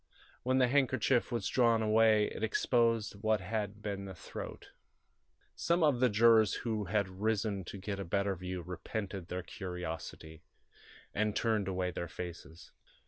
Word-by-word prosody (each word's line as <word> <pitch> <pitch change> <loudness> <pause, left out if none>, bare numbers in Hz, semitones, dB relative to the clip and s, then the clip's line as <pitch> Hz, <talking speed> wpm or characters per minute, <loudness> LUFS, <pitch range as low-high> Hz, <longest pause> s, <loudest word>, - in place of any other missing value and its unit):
When 130 +1 +1
the 130 -1 +5
handkerchief 130 -2 +2
was 115 -4 -1
drawn 115 -3 +3
away 110 -1 +5
it - - -6
exposed 115 -2 +1
what 110 -1 +2
had 105 +2 -4
been 100 -1 -3
the 95 -1 -8
throat. - - -8 0.9
Some 170 0 +1
of 145 -5 +3
the 125 0 +4
jurors 110 0 +5
who 110 -3 -1
had 100 +1 +1
risen 105 -2 0
to 100 - -7
get 100 +1 -4
a - - -2
better 100 +2 0
view 90 0 -5
repented 95 +1 -5
their 90 0 -4
curiosity, 80 -4 -6 0.7
and 105 0 0
turned 110 -4 +1
away 90 -1 -1
their 85 - -4
faces. 85 -1 -8
105 Hz, 150 wpm, -33 LUFS, 95-115 Hz, 0.9 s, the